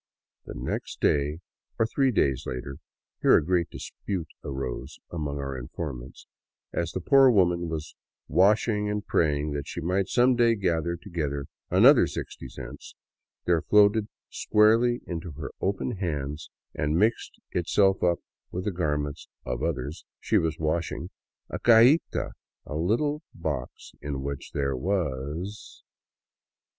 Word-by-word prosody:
The - - -7
next - - -4
day 75 +3 +1 0.2
— - - -50
or 115 - +3
three 135 +4 +2
days 70 - +1
later; 70 +2 -5 0.4
here - - +6
a 75 - 0
great 90 -1 +1
dispute 95 -5 -5
arose 65 +1 -5
among 75 -4 -3
our 70 -1 -4
informants 65 0 -7 0.2
— - - -51
as 85 - -1
the 95 - -4
poor 135 +7 +6
woman 90 -6 +3
was 80 -2 -5 0.3
washing 105 +1 +3
and 105 0 -2
praying 75 -1 +1
that 70 -1 -4
she - - -5
might 90 +3 0
some 125 +1 +4
day 120 -1 +4
gather 85 -4 0
together 80 -7 -3 0.2
an - - +5
other - - +8
sixty - - -6
cents, - - -10 0.5
there 85 -2 +3
floated 105 +2 +4 0.2
squarely 115 +3 +3
into 85 -2 -5
her 75 +1 -6
open 100 +4 -1
hands 75 -5 -3 0.2
and 75 +2 0
mixed 110 +5 +1
itself 95 +2 +2
up 85 -1 +2 0.3
with 90 +1 -4
the 105 - 0
garments 75 -4 -2
— - - -42
of 60 -1 -3
others 70 +5 -3
— - - -66
she - - +2
was 80 -1 -1
washing, 80 +1 -2 0.4
a - - -5
cajita, 120 +7 +5 0.3
a 75 - -6
little 120 - 0
box 60 - -5
in 70 -2 -4
which 70 0 -5
there 70 -2 0
was. 85 +3 -3
85 Hz, 150 wpm, -27 LUFS, 75-105 Hz, 0.5 s, other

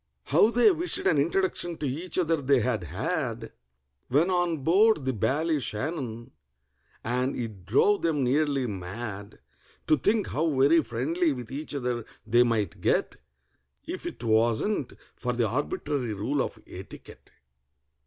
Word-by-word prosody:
How 215 - +4
they 240 - +5
wished 350 0 -1
an 150 - +3
introduction 175 +1 0
to 150 - -4
each 160 +7 -2
other 165 -4 +1
they 140 -1 +3
had 110 -6 -1
had 75 - -3 0.6
When 155 +8 +2
on 175 -5 0
board 190 0 +4
the 130 - 0
Ballyshannon! 130 - -2 0.7
And 125 +3 0
it 105 -7 -6
drove 200 - +3
them 155 -5 +1
nearly 140 +1 +1
mad 100 +1 -6 0.4
To 155 - +4
think 205 - +1
how 160 +3 0
very 155 +5 +5
friendly 150 +7 0
with 125 -3 -8
each 145 +2 -5
other 125 -3 -2 0.2
they 120 +2 +4
might 115 -4 0
get, - - +1 0.7
If - - -5
it - - -8
wasn't 115 - +1 0.2
for 125 - -2
the 120 -2 +1
arbitrary 130 -1 -2
rule 130 +8 -1
of - - -4
etiquette! - - -12
135 Hz, 140 wpm, -27 LUFS, 120-165 Hz, 0.7 s, they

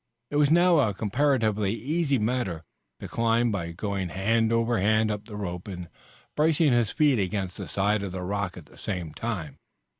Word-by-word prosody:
It 145 - 0
was 145 -1 +4
now 175 0 +5
a 105 -8 +2
comparatively 110 -2 +1
easy 145 +2 0
matter 105 -7 -1 0.4
to - - -7
climb 115 0 +1
by 85 -5 -3
going 95 +1 -3
hand 110 +4 +1
over 115 0 +2
hand 110 +2 +3
up 105 0 -4
the 110 -2 -9
rope 90 -3 -5
and 90 -4 -7 0.5
bracing 155 -2 +3
his 120 -3 +2
feet 145 -6 +3
against 95 -1 -2
the - - -7
side 100 +2 +1
of 100 -2 -4
the 90 0 -5
rock 100 -1 -2
at 85 - -10
the - - -18
same 90 -6 -4
time. 90 - -4
105 Hz, 185 wpm, -26 LUFS, 95-120 Hz, 0.5 s, now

